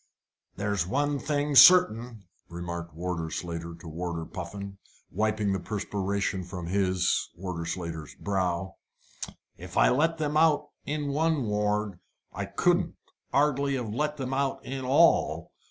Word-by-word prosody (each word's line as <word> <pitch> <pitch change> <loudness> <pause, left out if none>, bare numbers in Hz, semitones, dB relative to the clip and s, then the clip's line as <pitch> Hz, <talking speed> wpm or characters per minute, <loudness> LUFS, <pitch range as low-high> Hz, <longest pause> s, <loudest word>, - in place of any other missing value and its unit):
"There's 100 -4 -1
one 145 +5 0
thing 145 0 -1
certain," 125 - +7 0.3
remarked 85 -1 -6
Warder 85 -1 -3
Slater 85 0 -5
to 85 0 -13
Warder 85 0 -4
Puffin, 100 +3 -7 0.3
wiping 105 0 0
the 95 - -1
perspiration 100 -1 -2
from 90 -1 -7
his 95 0 +1
Warder 85 -2 -5
Slater's 85 -3 -5
brow, 95 -2 -2 0.8
"if - - -8
I - - +6
let 160 +6 +2
them 150 -1 -1
out 155 -2 +3 0.2
in 150 -1 -2
one 155 0 +1
ward, 105 -2 -1 0.3
I 100 0 -3
couldn't 175 - +1 0.4
'ardly 140 -1 +2
let 130 +6 -2
them 130 -1 -3
out 135 0 -1
in 135 0 -4
all. 130 - +3
100 Hz, 130 wpm, -28 LUFS, 90-140 Hz, 0.8 s, certain